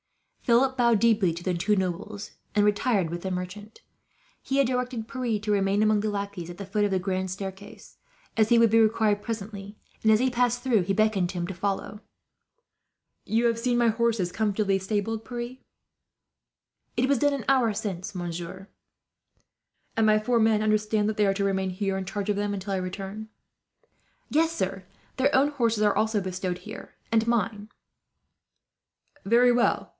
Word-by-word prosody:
Philip 255 Hz, +2 st, +3 dB
bowed 235 Hz, -4 st, +3 dB
deeply 220 Hz, -6 st, +3 dB
to 170 Hz, +2 st, -7 dB
the 185 Hz, -, 0 dB
two 195 Hz, +5 st, +1 dB
nobles, 190 Hz, +3 st, -3 dB, 0.2 s
and 205 Hz, 0 st, +4 dB
retired 205 Hz, -4 st, +1 dB
with 175 Hz, 0 st, -4 dB
the 190 Hz, -, -3 dB
merchant. 185 Hz, +4 st, -6 dB, 0.6 s
He 270 Hz, -, -2 dB
had 275 Hz, -, +4 dB
directed 250 Hz, -3 st, -2 dB
Pierre 245 Hz, -5 st, -2 dB
to 210 Hz, +1 st, -3 dB
remain 200 Hz, 0 st, +2 dB
among 215 Hz, -1 st, +3 dB
the 215 Hz, -, -1 dB
lackeys 200 Hz, -4 st, -4 dB
at 175 Hz, -, -9 dB
the 200 Hz, -, -6 dB
foot 205 Hz, +2 st, 0 dB
of 205 Hz, -, +2 dB
the 190 Hz, -, +1 dB
grand 185 Hz, 0 st, -2 dB
staircase, 195 Hz, +2 st, -8 dB, 0.4 s
as 220 Hz, -1 st, +3 dB
he 235 Hz, -, +5 dB
would 230 Hz, -2 st, +5 dB
be 225 Hz, -, +5 dB
required 215 Hz, -2 st, +2 dB
presently; 205 Hz, -2 st, -6 dB, 0.3 s
and 220 Hz, -, +5 dB
as 215 Hz, -, +5 dB
he 260 Hz, +1 st, +2 dB
passed 245 Hz, 0 st, +1 dB
through, 240 Hz, -6 st, +3 dB
he 180 Hz, +2 st, -2 dB
beckoned 215 Hz, -4 st, +2 dB
to 185 Hz, -, -6 dB
him 175 Hz, 0 st, -2 dB
to 190 Hz, -, -5 dB
follow. 200 Hz, +3 st, -3 dB, 1.2 s
"You 230 Hz, +2 st, +1 dB
have 230 Hz, -1 st, +2 dB
seen 245 Hz, 0 st, +1 dB
my 240 Hz, -1 st, +4 dB
horses 225 Hz, -5 st, 0 dB
comfortably 205 Hz, -2 st, 0 dB
stabled, 215 Hz, +3 st, -2 dB
Pierre?" 240 Hz, +1 st, -6 dB, 1.4 s
"It 250 Hz, +2 st, +2 dB
was 275 Hz, -2 st, +2 dB
done 290 Hz, +2 st, +3 dB
an 275 Hz, -5 st, -4 dB
hour 255 Hz, -4 st, +3 dB
since, 200 Hz, -1 st, -5 dB
monsieur." 175 Hz, +2 st, -6 dB, 1.3 s
"And 225 Hz, -, +3 dB
my 215 Hz, 0 st, +5 dB
four 235 Hz, +2 st, +1 dB
men 220 Hz, -1 st, +3 dB
understand 215 Hz, 0 st, +1 dB
that 215 Hz, -, -1 dB
they 210 Hz, -1 st, +2 dB
are 195 Hz, -, +1 dB
to 200 Hz, 0 st, 0 dB
remain 190 Hz, -1 st, 0 dB
here, 195 Hz, +1 st, -2 dB
in 190 Hz, -, -4 dB
charge 200 Hz, +1 st, -4 dB
of 205 Hz, -, +2 dB
them, 205 Hz, 0 st, -1 dB
until 195 Hz, 0 st, -4 dB
I -, -, 0 dB
return?" 195 Hz, +4 st, -6 dB, 1.0 s
"Yes, 325 Hz, +2 st, +2 dB
sir. 195 Hz, -, -3 dB, 0.3 s
Their 275 Hz, +3 st, +2 dB
own 275 Hz, +1 st, +4 dB
horses 230 Hz, -7 st, 0 dB
are 205 Hz, -1 st, +3 dB
also 215 Hz, +1 st, +1 dB
bestowed 185 Hz, -1 st, -3 dB
here, 210 Hz, +5 st, -10 dB, 0.2 s
and 225 Hz, 0 st, +3 dB
mine." 210 Hz, -2 st, -1 dB, 1.5 s
"Very 240 Hz, +4 st, +5 dB
well. 240 Hz, 0 st, +1 dB
210 Hz, 180 wpm, -26 LUFS, 195-230 Hz, 1.5 s, he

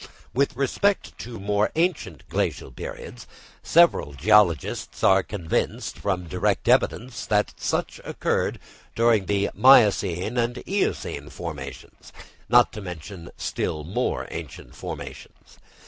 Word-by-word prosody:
With 140 Hz, 0 st, +1 dB
respect 185 Hz, +10 st, 0 dB
to 115 Hz, -2 st, -7 dB
more 105 Hz, +1 st, +1 dB
ancient 175 Hz, +3 st, -1 dB
glacial -, -, -2 dB
periods, 480 Hz, -1 st, -8 dB, 0.3 s
several 165 Hz, -, +3 dB
geologists 85 Hz, -1 st, +2 dB
are 95 Hz, 0 st, +6 dB
convinced, 90 Hz, -4 st, -3 dB
from 95 Hz, -3 st, -2 dB
direct 80 Hz, -, -1 dB
evidence, 120 Hz, -4 st, +1 dB
that 105 Hz, -1 st, +1 dB
such -, -, -2 dB
occurred -, -, -1 dB, 0.4 s
during 115 Hz, -4 st, +3 dB
the 100 Hz, 0 st, 0 dB
miocene 105 Hz, -5 st, +4 dB
and 120 Hz, +1 st, 0 dB
eocene 200 Hz, +1 st, -2 dB
formations, -, -, -8 dB, 0.4 s
not 120 Hz, +1 st, +5 dB
to 105 Hz, -, -7 dB
mention 90 Hz, 0 st, -8 dB
still 75 Hz, -1 st, -3 dB
more 85 Hz, +6 st, -2 dB
ancient -, -, -8 dB
formations. -, -, -9 dB
105 Hz, 115 wpm, -24 LUFS, 95-125 Hz, 0.4 s, are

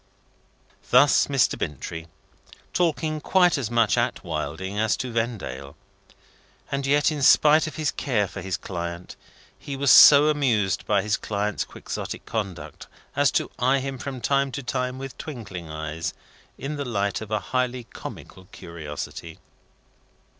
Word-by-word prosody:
Thus 130 Hz, +4 st, +5 dB
Mr. 135 Hz, -4 st, +2 dB
Bintrey; 80 Hz, +3 st, -5 dB, 0.7 s
talking 160 Hz, -3 st, 0 dB
quite 180 Hz, 0 st, +4 dB
is 135 Hz, -7 st, -2 dB
much 115 Hz, -3 st, +2 dB
at -, -, -1 dB
Wilding 95 Hz, +7 st, -4 dB
as 110 Hz, -1 st, +2 dB
to 125 Hz, -, -4 dB
Vendale. 100 Hz, -, -4 dB, 1.0 s
And 140 Hz, 0 st, -2 dB
yet, 145 Hz, +2 st, +3 dB
in 150 Hz, -2 st, -4 dB
spite 155 Hz, +3 st, +6 dB
of 155 Hz, -, -7 dB
his 155 Hz, -2 st, -1 dB
care 110 Hz, -8 st, 0 dB
for 95 Hz, -, -8 dB
his 95 Hz, 0 st, -3 dB
client, 85 Hz, -1 st, -6 dB, 0.4 s
he 140 Hz, -, -6 dB
was 135 Hz, -2 st, +3 dB
so 145 Hz, +1 st, +9 dB
amused 115 Hz, -, +1 dB
by 100 Hz, -2 st, +2 dB
his 105 Hz, -1 st, 0 dB
client's 105 Hz, 0 st, -2 dB
Quixotic -, -, -7 dB
conduct, 90 Hz, -9 st, -5 dB, 0.3 s
as -, -, +4 dB
to -, -, 0 dB
eye 130 Hz, +2 st, +3 dB
him 135 Hz, -1 st, -4 dB
from 130 Hz, -2 st, -6 dB
time 140 Hz, +1 st, +1 dB
to 140 Hz, -, -4 dB
time 125 Hz, 0 st, -2 dB
with 135 Hz, 0 st, -7 dB
twinkling 95 Hz, -, -7 dB
eyes, 80 Hz, +1 st, -4 dB, 0.4 s
in 145 Hz, +2 st, -5 dB
the 140 Hz, -, -2 dB
light 100 Hz, -6 st, -1 dB
of 110 Hz, -, -7 dB
a 110 Hz, -, +1 dB, 0.2 s
highly 125 Hz, -1 st, 0 dB
comical 95 Hz, -4 st, -10 dB
curiosity. 80 Hz, -1 st, -8 dB
120 Hz, 145 wpm, -24 LUFS, 95-140 Hz, 1.0 s, so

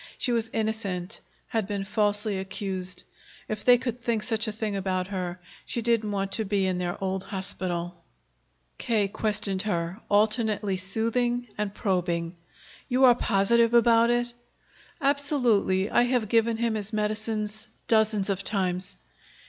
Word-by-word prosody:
She 250 Hz, -, -1 dB
was 230 Hz, -1 st, 0 dB
innocent, 215 Hz, -3 st, -2 dB, 0.3 s
had 220 Hz, -5 st, -1 dB
been 200 Hz, -2 st, -2 dB
falsely 205 Hz, 0 st, 0 dB
accused. 190 Hz, -1 st, -5 dB, 0.4 s
If 215 Hz, -1 st, -4 dB
they 245 Hz, -1 st, +7 dB
could 245 Hz, -1 st, -4 dB
think 230 Hz, -3 st, 0 dB
such 225 Hz, -2 st, -1 dB
a -, -, -1 dB
thing 215 Hz, -1 st, -3 dB
about 185 Hz, -1 st, -1 dB
her, 180 Hz, -2 st, -3 dB, 0.2 s
she 235 Hz, -, -3 dB
didn't 230 Hz, -2 st, +1 dB
want 195 Hz, -1 st, -2 dB
to 220 Hz, -, -1 dB
be 200 Hz, -1 st, +1 dB
in 185 Hz, -1 st, 0 dB
their 175 Hz, -1 st, -2 dB
old 190 Hz, 0 st, -1 dB
hospital. 175 Hz, -3 st, -4 dB, 0.8 s
K. 215 Hz, -4 st, +1 dB
questioned 205 Hz, -2 st, -1 dB
her, 175 Hz, -1 st, -2 dB
alternately 210 Hz, -1 st, +2 dB
soothing 230 Hz, +5 st, 0 dB
and 210 Hz, -1 st, -2 dB
probing. 175 Hz, -4 st, -1 dB, 0.5 s
"You 255 Hz, +1 st, +2 dB
are 245 Hz, -, +8 dB
positive 230 Hz, +1 st, +3 dB
about 235 Hz, 0 st, +5 dB
it?" 240 Hz, 0 st, +1 dB, 0.7 s
"Absolutely. 255 Hz, -, +2 dB
I -, -, +5 dB
have 245 Hz, -4 st, 0 dB
given 230 Hz, 0 st, +3 dB
him 230 Hz, -1 st, 0 dB
his 215 Hz, -1 st, -3 dB
medicines 215 Hz, 0 st, -2 dB, 0.2 s
dozens 215 Hz, -3 st, +3 dB
of 195 Hz, 0 st, -2 dB
times." 185 Hz, -3 st, -1 dB
210 Hz, 145 wpm, -27 LUFS, 190-230 Hz, 0.8 s, are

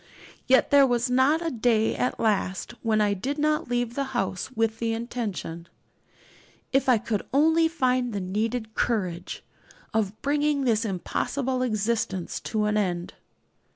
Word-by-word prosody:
Yet 260 Hz, 0 st, +4 dB
there 280 Hz, -1 st, +7 dB
was 245 Hz, 0 st, 0 dB
not 285 Hz, +6 st, +3 dB
a 330 Hz, -, 0 dB
day 225 Hz, -2 st, +2 dB
at 250 Hz, -, -1 dB
last 205 Hz, -2 st, 0 dB
when 220 Hz, -2 st, +2 dB
I 205 Hz, -1 st, +2 dB
did 260 Hz, +9 st, -3 dB
not 305 Hz, -3 st, 0 dB
leave 245 Hz, -1 st, -1 dB
the 275 Hz, -, -1 dB
house 190 Hz, 0 st, -2 dB
with 225 Hz, -1 st, 0 dB
the 230 Hz, -1 st, 0 dB
intention 215 Hz, -8 st, -5 dB, 1.1 s
if 270 Hz, 0 st, +2 dB
I 250 Hz, -, +6 dB
could 210 Hz, -1 st, -2 dB
only 320 Hz, +4 st, +4 dB
find 255 Hz, -6 st, 0 dB
the 205 Hz, -, -2 dB
needed 220 Hz, +4 st, -2 dB
courage 185 Hz, -8 st, -2 dB, 0.5 s
of 215 Hz, -1 st, -1 dB
bringing 290 Hz, 0 st, +1 dB
this 230 Hz, -3 st, +2 dB
impossible 255 Hz, +7 st, -2 dB
existence 215 Hz, -5 st, -1 dB
to 215 Hz, -1 st, -1 dB
an 210 Hz, 0 st, +1 dB
end. 180 Hz, -4 st, -1 dB
230 Hz, 150 wpm, -26 LUFS, 210-260 Hz, 1.1 s, there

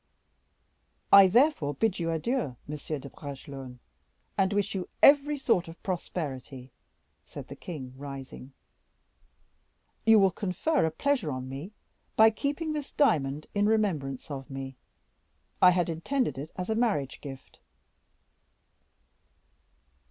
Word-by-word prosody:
"I 195 Hz, -1 st, +10 dB
therefore 220 Hz, -, +3 dB
bid 205 Hz, +5 st, 0 dB
you 165 Hz, -1 st, -1 dB
adieu, 165 Hz, -, -1 dB
Monsieur 150 Hz, +1 st, -4 dB
de 140 Hz, -, -9 dB
Bragelonne, 135 Hz, -2 st, -9 dB, 0.6 s
and 190 Hz, -1 st, +2 dB
wish 205 Hz, +1 st, 0 dB
you 185 Hz, -2 st, -4 dB
every 290 Hz, +1 st, +6 dB
sort 230 Hz, -11 st, +1 dB
of 165 Hz, +1 st, -12 dB
prosperity," 135 Hz, -8 st, -5 dB, 0.5 s
said -, -, -10 dB
the -, -, -7 dB
king, 135 Hz, -7 st, -8 dB
rising; 135 Hz, -1 st, -9 dB, 1.5 s
"you 225 Hz, 0 st, +7 dB
will 195 Hz, -2 st, +5 dB
confer 200 Hz, -, 0 dB
a -, -, +1 dB
pleasure 240 Hz, -, 0 dB
on 130 Hz, -1 st, -5 dB
me 140 Hz, +10 st, -7 dB, 0.4 s
by 220 Hz, 0 st, +7 dB
keeping 290 Hz, +7 st, -2 dB
this 295 Hz, -2 st, -5 dB
diamond 155 Hz, -, +1 dB
in 205 Hz, 0 st, +2 dB
remembrance 160 Hz, -11 st, 0 dB
of 135 Hz, -2 st, -6 dB
me; 135 Hz, -1 st, -6 dB, 0.9 s
I 180 Hz, -, +9 dB
had 175 Hz, -1 st, +2 dB
intended 170 Hz, -, -1 dB
it 145 Hz, +3 st, -6 dB
as 185 Hz, +3 st, -3 dB
a -, -, +3 dB
marriage 215 Hz, -, 0 dB
gift." 135 Hz, -2 st, -10 dB
170 Hz, 125 wpm, -28 LUFS, 140-220 Hz, 1.5 s, I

